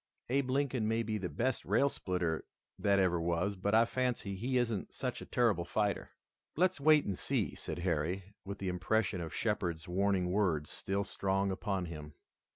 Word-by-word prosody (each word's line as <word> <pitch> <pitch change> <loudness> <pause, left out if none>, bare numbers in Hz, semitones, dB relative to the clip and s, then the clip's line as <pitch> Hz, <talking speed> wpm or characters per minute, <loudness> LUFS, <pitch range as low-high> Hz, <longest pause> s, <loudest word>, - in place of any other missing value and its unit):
"Abe 135 0 +1
Lincoln 130 -4 +1
may 115 +1 +1
be 110 -1 -2
the 90 -2 -3
best 130 +2 -1
rail 140 - +3
splitter 90 - -1 0.4
that 100 0 +3
ever 90 -3 +3
was, 85 +4 0
but 100 +3 +1
I 115 +1 +6
fancy 125 -5 -1
he 125 +6 0
isn't 115 -5 0
such - - -3
a - - -8
terrible 115 -8 +2
fighter." 100 +3 -1 0.5
"Let's 180 -1 +2
wait 155 0 +6
and 100 - -1
see," - - 0
said - - -5
Harry, 90 +3 -1
with 100 0 -6
the 95 - -4
impression 90 +1 0
of 80 -2 -5
Shepard's 90 -6 -1
warning 95 0 +1
words 85 -7 +1
still 100 +1 -1
strong 95 -1 0
upon 95 -1 -1
him. 75 -3 -8
100 Hz, 175 wpm, -33 LUFS, 90-115 Hz, 0.5 s, I